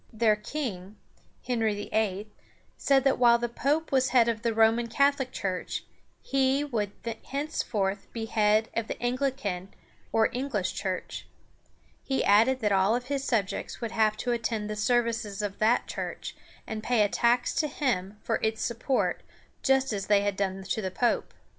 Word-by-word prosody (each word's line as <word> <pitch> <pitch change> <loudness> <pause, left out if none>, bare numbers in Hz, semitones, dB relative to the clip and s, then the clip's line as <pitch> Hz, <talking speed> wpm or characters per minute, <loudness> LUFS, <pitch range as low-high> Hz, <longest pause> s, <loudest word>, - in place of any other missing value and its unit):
Their 220 -2 +3
king, 210 -5 -5 0.5
Henry 225 -4 0
VIII., 205 -1 -1 0.5
said 270 -2 +3
that 270 -2 +2
while 235 -1 +6
the 240 0 -2
pope 290 +7 -1
was 265 -1 +3
head 240 -2 +4
of 225 -2 -1
the 230 0 +1
Roman 225 +1 +3
Catholic 280 +1 +2
Church, 185 -2 -3 0.4
he 270 +1 +2
would 220 -8 -2 0.4
henceforth 220 -9 -2
be 225 -1 -4
head 215 0 +2
of 230 -1 -1
the - - -3
An´gli 255 +2 -1
can 185 -5 -4 0.4
or 220 0 +3
English 245 -7 -2
Church. 185 -1 -4 0.8
He 270 - 0
added 230 +6 +4
that 210 -2 +1
all 195 +5 +3
his 270 +2 -3
subjects 215 -8 -1
would 230 -2 -4
have 215 -1 +2
to 245 - -2
attend 225 -3 -2
the - - -3
services 225 -2 0
of 200 -1 -4
that 225 +3 +3
church, - - -5 0.3
and 220 -1 -5
pay 230 -1 +3
a - - +3
tax 240 +4 +2
to 305 - +2
him 215 -9 -2
for - - 0
its 220 0 -1
support, 240 +3 0 0.4
just 270 -2 +2
as 195 -2 -3
they 205 -1 +4
had 205 -1 -1
done 190 -1 -2
to 220 - -2
the 190 - -2
pope. 240 +6 0
225 Hz, 165 wpm, -28 LUFS, 210-255 Hz, 0.8 s, while